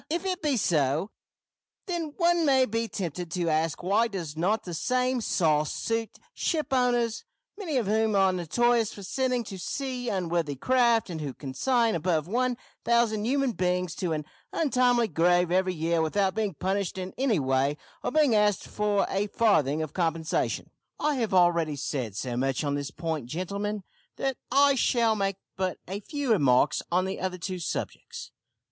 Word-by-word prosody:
If 340 +4 -2
it 370 0 -2
be 290 -4 +1
so, 155 - +1 0.7
then 335 -5 -3
one 345 -1 +3
may 265 -3 +4
be 230 0 -2
tempted 175 -4 -4
to 170 -1 -1
ask 160 +1 0
why 205 +6 +3
does 175 -8 -5
not 195 +7 0
the 175 - -6
same 250 +8 0
`sauce' 155 -8 +2
suit 225 -1 -3 0.2
shipowners, 250 - 0 0.3
many 355 -9 -2
of 240 - +1
whom 215 +1 +1
are 190 -1 +4
notorious 225 +6 +1
for 200 - -10
sending 255 +4 0
to 195 -3 -8
sea 250 +5 -3
unseaworthy 170 -6 -1
craft, 235 - +2
and 160 -2 -5
who 140 -4 -5
consign 225 - +1
above 165 -2 0
one 250 +4 0 0.3
thousand 230 -3 +2
human 275 0 +1
beings 180 -3 -1
to 180 -3 -2
an 155 -2 -2 0.3
untimely 250 -6 +2
grave 175 0 +2
every 185 0 +1
year 165 +1 +1
without 190 +4 +1
being 210 -5 -2
punished 190 +1 -2
in 185 0 -5
any 255 -5 +1
way 135 +1 +1 0.3
or - - 0
being 300 -5 +3
asked 210 -2 +2
for 210 -1 +1
a 200 +2 -1
farthing 160 - +2
of 155 - -7
compensation? 165 -2 -1 0.3
"I 300 - +1
have 225 -4 -1
already 170 -4 +3
said 130 -7 -3
so 120 +2 -3
much 135 +2 0
on 145 -1 0
this 145 0 -3
point 160 -7 -4
gentlemen, 200 +7 -3 0.3
that 270 -2 -2
I 280 +2 +5
shall 235 -3 +2
make 195 -2 0 0.2
but 185 -1 -2
a 195 +3 -4
few 280 +4 -3
remarks 140 - +3
on 180 +2 +2
the 190 +1 -4
other 185 -1 -2
two 185 +1 -4
subjects. 165 - -5
195 Hz, 170 wpm, -27 LUFS, 165-240 Hz, 0.7 s, I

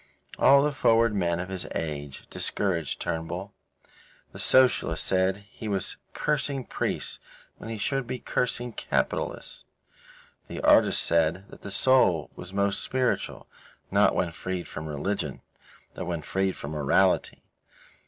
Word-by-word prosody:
All 140 0 +7
the 150 - +2
forward 115 -3 +3
men 85 -4 0
of 90 +1 -4
his 95 -2 -4
age 75 -3 -4
discouraged 85 -7 -1
Turnbull. 85 +4 -4 0.8
The - - -10
socialists 125 -11 +4
said 95 +2 +1
he 110 - -7
was 100 -3 -2 0.2
cursing 140 -3 -1
priests - - -3 0.4
when 115 - -8
he 115 - -4
should 135 +4 -1
be 130 +1 -3
cursing 120 0 -2
capitalists. - - -2 0.8
The - - -6
artists - - +5
said 85 +4 +1
that - - -13
the 100 - -7
soul 95 - +3
was 90 - -8
most 100 0 +1
spiritual, 130 -1 -1 0.5
not - - +4
when 85 - 0
freed 90 +2 -4
from 80 0 -6
religion, 95 +8 -3 0.5
but 90 - -5
when 85 -2 -3
freed 95 +2 -1
from 70 - -6
morality. 75 -3 +2
95 Hz, 135 wpm, -27 LUFS, 85-115 Hz, 0.8 s, All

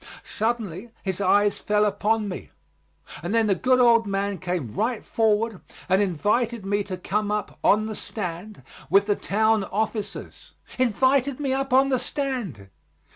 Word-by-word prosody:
Suddenly 220 -2 -2
his 190 0 -3
eyes 205 +1 +3
fell 210 0 +2
upon 215 +1 0
me, 130 - -6 0.7
and 175 +7 -2
then 225 -1 +4
the 205 - +3
good 255 +6 +2
old 230 -2 +5
man 200 -1 -1
came 175 - -3
right 230 - -1
forward 220 -2 +1 0.3
and 190 +2 +3
invited 210 +5 0
me 205 +1 +1
to 185 -2 -5
come 205 +3 -1
up 210 0 -3
on 215 +1 +4
the 220 - -4
stand 190 - -6 0.3
with 195 +4 +5
the 205 -1 +1
town 220 +1 +1
officers. 215 0 -4 0.3
Invited 260 +3 +2
me 275 -3 0
up 270 0 -2
on 265 +2 +5
the 260 -2 +2
stand! 235 - -4
210 Hz, 155 wpm, -24 LUFS, 195-235 Hz, 0.7 s, old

